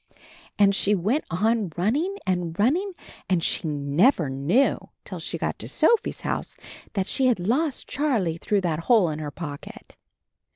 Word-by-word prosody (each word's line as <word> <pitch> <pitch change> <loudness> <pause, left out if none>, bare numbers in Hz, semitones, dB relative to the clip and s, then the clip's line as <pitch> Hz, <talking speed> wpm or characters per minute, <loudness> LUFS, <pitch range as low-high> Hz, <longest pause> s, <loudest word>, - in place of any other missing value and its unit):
And 200 -1 +5
she 205 +1 +2
went 210 - 0
on 210 +2 0
run 195 +6 +2
ning 365 +8 -1
and 175 -3 -1
running 340 - +1 0.4
and 180 -3 +1
she - - -1
never 150 - +2
knew 155 - +2 0.3
till - - -7
she - - -4
got - - -3
to - - -7
Sophie's 465 - +2
house - - -3 0.4
that 195 -3 0
she 260 +5 +1
had 245 -6 +2
lost 260 - -1
Charlie 230 - 0
through 205 +2 0
that 165 -4 -1
hole 215 -8 +5
in 150 - -5
her 150 -1 -4
pocket! 145 -1 -9
195 Hz, 165 wpm, -25 LUFS, 165-255 Hz, 0.4 s, And